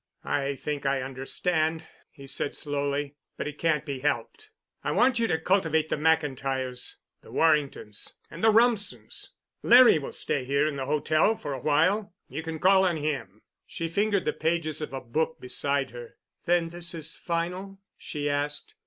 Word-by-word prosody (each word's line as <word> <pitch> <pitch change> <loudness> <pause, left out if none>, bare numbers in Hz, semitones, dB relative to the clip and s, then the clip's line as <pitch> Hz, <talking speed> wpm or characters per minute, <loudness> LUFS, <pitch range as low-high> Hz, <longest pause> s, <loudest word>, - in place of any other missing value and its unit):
"I 140 0 0
think 145 +1 -4
I 135 -1 +1
understand," 155 +5 -1 0.2
he 140 - -13
said 140 +1 -1
slowly. 145 0 -2 0.2
"But - - -3
it 150 0 -7
can't 155 -3 +1
be 140 -3 -4
helped. 145 - -2 0.3
I - - -1
want 245 -1 +3
you 230 - +2
to 160 - +1
cultivate 160 -3 +1
the - - +1
McIntyres, 135 -5 0 0.3
the - - -15
Warringtons, 145 -9 0 0.2
and 165 - -8
the 220 - +7
Rumsens. 225 -2 +1 0.3
Larry 245 -8 +7
will 140 - -6
stay 135 - -1
here 140 +3 +2
in 150 - -2
the 135 -1 -4
hotel 155 +7 +2
for 145 - -5
a 130 - -5
while. 180 - +2
You 145 +5 -5
can 160 -1 -5
call 190 +3 +5
on 175 -3 +2
him." 140 -9 -4 0.2
She 165 -1 -4
fingered 200 +3 +1
the - - +1
pages 160 -2 -1
of 150 - -4
a 135 -1 -5
book 160 +6 -1
beside 140 +1 0
her. 120 -1 -10 0.3
"Then 170 -1 +3
this 170 0 -5
is 160 -1 -3
final?" 180 +3 -3 0.2
she 145 -1 -4
asked. 145 - -2
155 Hz, 170 wpm, -27 LUFS, 140-170 Hz, 0.3 s, the